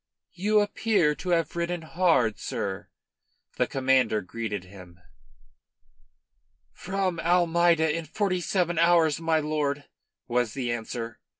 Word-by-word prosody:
"You 210 +3 +2
appear 205 -6 +1
to 180 +5 -7
have 165 -2 +1
ridden 170 0 -2
hard, 160 - +1
sir," 95 -1 -4 0.7
the - - +2
Commander 130 -5 +2
greeted 105 0 -5
him. 90 -2 -14 1.7
"From 185 -2 -2
Almeida 170 -2 +3
in 165 -1 -4
forty 185 +2 -1
seven 175 -2 0
hours, 165 -2 +3
my 165 -1 +2
lord," 150 -2 -1 0.4
was 120 -2 0
the 125 -3 -2
answer. 115 0 -5
160 Hz, 115 wpm, -26 LUFS, 120-175 Hz, 1.7 s, Almeida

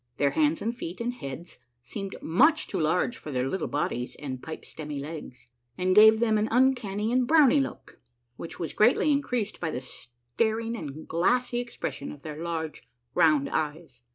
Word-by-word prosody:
Their 140 -1 +2
hands 155 +2 +1
and 230 +2 -1
feet 175 -6 -6
and 240 +1 -2
heads 150 - -8 0.2
seemed 195 +9 -6
much 295 - +4
too 190 - -3
large 175 +9 +1
for - - -9
their 130 -2 -1
little 180 +4 -2
bodies 125 -4 -2
and 130 -3 -6
pipe 160 - -7
stemmy 150 -2 -6
legs, 145 -3 -8 0.3
and 185 +1 +2
gave 220 +2 +8
them 220 -2 +2
an 215 - +1
un 260 +4 +4
canny 210 -2 -3
and 250 0 +2
brownie 295 -2 +6
look, 270 - -7 0.4
which 165 - -8
was 165 - -3
greatly 245 +7 +4
increased 250 -7 -1
by 165 - -2
the 125 - -3
staring 130 - -3
and 155 -6 -7
glassy 240 +8 +1
expression 240 -11 -5
of 145 - -12
their 155 0 -7
large, 165 -2 -4 0.3
round 155 -5 +4
eyes. 150 -4 -3
175 Hz, 180 wpm, -27 LUFS, 150-230 Hz, 0.4 s, gave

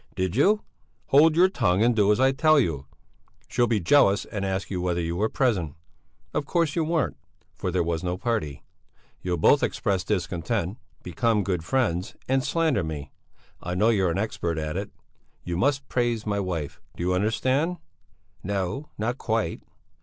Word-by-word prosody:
"Did 95 0 -1
you...." 205 - +3 0.5
"Hold 155 +3 +6
your 180 +3 +6
tongue 95 - +1
and 120 0 +3
do 105 -1 +4
as 105 - +2
I 130 +1 +5
tell 155 +2 +4
you! 75 - -1 0.6
She'll 120 - +1
be 115 -3 +1
jealous 100 -1 +4
and 105 -2 -5
ask 95 0 -2
you 90 -2 -2
whether 90 -1 0
you 85 0 -2
were 105 +5 0
present. 95 - 0 0.6
Of 145 - -2
course 165 -4 +1
you 165 - +1
weren't, 160 -1 0 0.4
for 95 - -4
there 90 -1 +1
was 85 0 -2
no 90 0 -2
party. 110 - -2 0.6
You'll 90 -1 -1
both 140 - +4
express 100 -5 0
discontent, 95 +1 -2 0.2
become 105 +5 +1
good 90 -4 -2
friends 95 -3 -1
and 135 0 +2
slander 160 - +1
me; 75 -3 -6 0.5
I 90 +1 -4
know 105 +5 +3
you're 95 -5 +2
an 85 - -1
expert 85 -5 -2
at 75 -1 -3
it. - - -3
But - - -37 0.4
you 85 - -3
must 135 +7 +1
praise 120 -3 0
my 100 -1 -1
wife. 85 -7 -4 0.2
Do - - -3
you 90 +1 +1
understand?" 130 - +1 0.6
"No; 100 +9 -3
not 120 +4 -2
quite." 110 -7 -1
100 Hz, 175 wpm, -25 LUFS, 90-130 Hz, 0.6 s, Hold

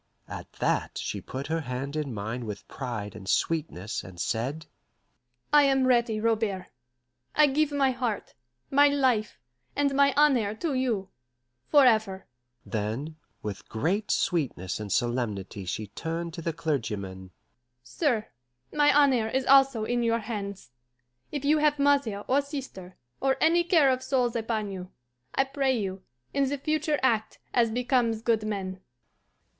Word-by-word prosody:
At - - -8
that - - -1
she - - -3
put 135 +1 -6
her 160 +2 -1
hand 135 +1 -4
in 150 -3 -2
mine 110 +2 -4
with 105 -2 -7
pride 115 -6 -5
and 95 - -8
sweetness, 145 - -1
and 90 -2 -11
said, 135 - -2 0.9
"I 295 - +8
am 270 -1 +3
ready, 235 -3 +2
Robert. 215 -4 0 0.7
I 300 - +7
give 295 +1 +1
my 275 -2 +2
heart, 245 -5 -3 0.4
my 285 +1 +6
life, 260 -7 +1 0.4
and 285 -1 +1
my 280 0 +5
honour 255 -8 +3
to 310 +5 -2
you 235 -8 -1 0.6
forever." 220 -9 +4 0.4
Then, 115 +9 -3 0.3
with 105 -2 -6
great 180 - -1
sweetness 130 - 0
and 105 -2 -6
solemnity 110 -6 -1
she 100 +4 -3
turned 165 - -5
to 170 - -6
the 165 - -1
clergyman: 105 - -3 0.5
"Sir, 225 - 0 0.5
my 295 -1 +5
honour 265 -6 +4
is 260 +3 -1
also 270 -4 +5
in 240 +1 0
your 230 -1 +2
hands. 200 - -6 0.6
If 285 -1 -3
you 305 +2 +4
have 300 -1 +3
mother 280 -8 +2
or 270 +3 +3
sister, 270 - -8 0.2
or 270 0 +1
any 340 +2 +4
care 325 -6 +4
of 255 0 -1
souls 260 -3 0
upon 220 -3 -2
you, 185 -1 -7 0.5
I 270 - +4
pray 270 -1 0
you, 195 -3 -3 0.3
in 275 -1 +2
the 285 - -1
future 305 +1 0
act 225 -4 +1 0.2
as 235 -2 +3
becomes 240 -1 +1
good 230 -2 +2
men." 190 -3 -3
220 Hz, 150 wpm, -27 LUFS, -, 0.9 s, I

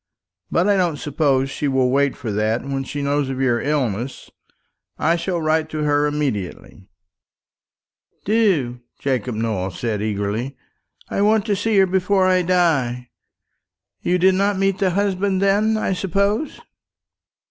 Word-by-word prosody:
But 175 +4 +1
I 205 -1 +3
don't 175 -5 +1
suppose 140 -3 0
she 145 - -2
will 130 -2 +2
wait 140 0 +2
for 115 - -4
that 110 +3 0
when 135 -1 -3
she 145 +2 -5
knows 140 -1 0
of 130 -1 -4
your 120 -3 +1
illness. 130 -4 -2 0.7
I 165 +2 +2
shall 175 +1 -2
write 155 0 0
to 155 -1 -3
her 145 0 +2
immediately." 110 -10 -4 1.4
"Do," 185 - +1 0.2
Jacob 125 -3 -2
Nowell 110 -4 -2
said 105 +2 -3
eagerly; 110 +5 -2 0.5
"I - - -1
want 215 0 +3
to 210 -3 +1
see 210 +1 0
her 195 - +6
before 190 +1 +1
I 185 -1 +3
die. 150 -9 +1 0.9
You 180 - +1
did 185 +1 +4
not 200 +1 +1
meet 195 0 +1
the 195 -2 +2
husband, 195 0 0
then, 205 +3 +2
I 205 - 0
suppose?" 200 - -1
150 Hz, 145 wpm, -21 LUFS, 130-190 Hz, 1.4 s, her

